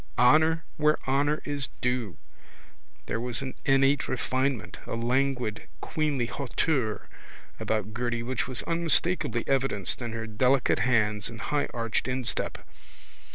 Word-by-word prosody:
Honour 160 +6 +4
where 150 0 +3
honour 145 +3 +1
is 145 -3 -1
due. 125 -6 -1 0.9
There 115 - -2
was 125 +2 -2
an 130 - -5
innate 135 0 +3
refinement, 130 -2 -1
a - - -3
languid 125 -1 0
queenly 150 -5 -1
hauteur 130 -2 -1 0.5
about 110 0 -1
Gerty 120 0 -2
which 130 +2 -2
was 130 -2 0
unmistakably 165 -6 +2
evidenced 135 -7 0
in 120 -1 -4
her 115 0 -4
delicate 125 +4 +2
hands 105 -4 +1
and 115 -1 -9
higharched 120 -6 -1
instep. 130 -1 -2
130 Hz, 120 wpm, -27 LUFS, 115-140 Hz, 0.9 s, Honour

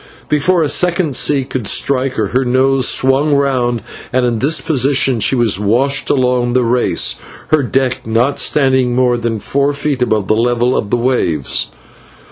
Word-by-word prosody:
Before 160 +4 +1
a - - 0
second 175 -2 0
sea 140 0 +2
could 130 -4 -5
strike 130 -1 0
her, 105 -3 -1
her 130 +2 0
nose 130 +1 +1
swung 135 +3 +1
round, 125 -5 0 0.3
and 125 0 +1
in 120 -2 -1
this 145 +6 +1
position 135 -3 +1
she 120 - +2
was 115 -6 +1
washed 125 +7 0
along 125 -2 +1
the 125 0 +2
race, 120 +1 0 0.3
her 155 -1 +3
deck 130 -1 -1
not 115 +5 0
standing 130 -4 +1
more 125 -1 +2
than 115 -1 -3
four 140 +7 -1
feet 145 -2 -3
above 110 -5 0
the - - +2
level 120 +2 0
of 100 - -2
the 120 - +1
waves. 115 - -1
130 Hz, 170 wpm, -14 LUFS, 120-140 Hz, 0.3 s, her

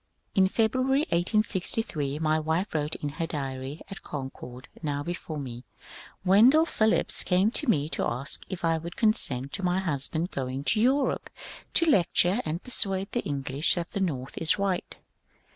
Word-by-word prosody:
In 190 -1 +4
February, 255 +7 +1
1863, 175 -5 0
my 155 0 +1
wife 160 +6 -2
wrote 150 0 -1
in 145 - -4
her 165 +3 -4
diary 135 -1 -5
at 195 0 -9
Concord 130 -2 -8
now 145 -2 -2
before 170 -1 -6
me: 130 -5 -6
^ 120 - -12 0.6
Wendell 240 - +6
Phillips 220 -8 +1
came 190 +4 +2
to 285 +1 0
me 150 -8 +2
to - - -2
ask 125 +4 -1
if 180 -2 -4
I 165 -1 +1
would 170 +2 -8
consent 140 - +2
to 195 - -3
my 180 0 +1
husband 165 0 +2
going 130 0 -4
to 215 +8 +2
Europe 265 +3 +1 0.5
to 335 - +5
lecture 195 - +3
and 160 +3 -4
per 255 - -5
suade 195 -3 +2
the 240 - -1
English 140 +1 +1
that 175 -1 -4
the - - -3
North 135 -8 -3
is 165 +4 +3
right. 195 -3 -2
170 Hz, 170 wpm, -27 LUFS, 145-200 Hz, 0.6 s, Wendell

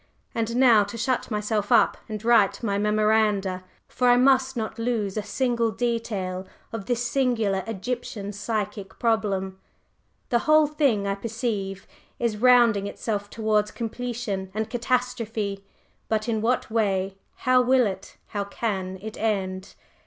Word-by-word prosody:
And 230 0 -1
now 240 -5 +6
to 205 +4 -7
shut 245 +2 -1
myself 210 -1 -1
up 235 - +5
and 215 0 -5
write 215 -3 +4
my 200 -3 0
memoranda 210 -3 +2 0.2
for 250 - 0
I 245 - +6
must 265 0 +3
not 220 +1 -4
lose 225 -4 -1
a 215 - 0
single 235 +2 0
detail 210 -5 -2 0.3
of 215 -4 -5
this 245 0 0
singular 235 -7 +1
Egyptian 225 -1 -4
psychic 205 -1 -4
problem. 200 -5 0 0.7
The 240 - +3
whole 310 0 +7
thing 280 -9 +1
I 200 - 0
perceive 205 -2 -3 0.3
is 235 -3 0
rounding 235 -4 +5
itself 205 -1 -3
towards 215 -1 +1
completion 230 -4 -4
and 220 0 -2
catastrophe 230 -5 -1 0.5
but 215 0 0
in 220 -2 0
what 235 0 0
way? 195 -3 0 0.2
How 255 0 +3
will 255 0 +4
it 190 -2 -5
how 205 -1 -2
can 190 -3 -3
it 220 0 -7
end?" 190 -3 -2
220 Hz, 140 wpm, -25 LUFS, 200-240 Hz, 0.7 s, whole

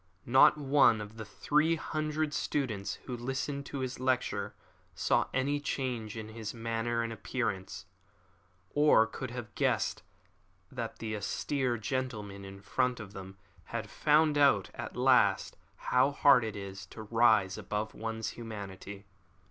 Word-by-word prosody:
Not 130 +4 +6
one 140 -5 +4
of 105 +1 -8
the 110 - -6
three 150 +10 +1
hundred 155 -1 -2
students 105 -11 -2
who 125 - -4
listened 135 +3 -3
to 140 - -4
his 130 -1 -4
lecture 120 -6 -1 0.4
saw - - +2
any 140 +3 0
change 125 -6 -3
in 110 -1 -6
his 110 0 -6
manner 115 +1 -1
and 115 0 -3
appearance, 110 -5 -3 0.9
or 145 -6 +5
could 130 +3 -6
have 120 -3 -7
guessed - - 0 0.7
that 115 -3 -5
the 110 -1 -4
austere 125 +4 -1
gentleman 110 -4 -4
in 95 0 -10
front 125 +3 0
of 100 -2 -9
them 95 0 -9 0.3
had 110 -2 -5
found 150 0 +3
out 135 -9 +4
at - - -7
last - - +3 0.2
how 130 +2 +2
hard 140 -3 +5
it 110 -2 -4
is 95 -1 -7
to 110 - -9
rise 110 -3 +3
above 105 +1 -3
one's 110 -1 -4
humanity. 100 -3 -8
115 Hz, 140 wpm, -31 LUFS, 105-130 Hz, 0.9 s, Not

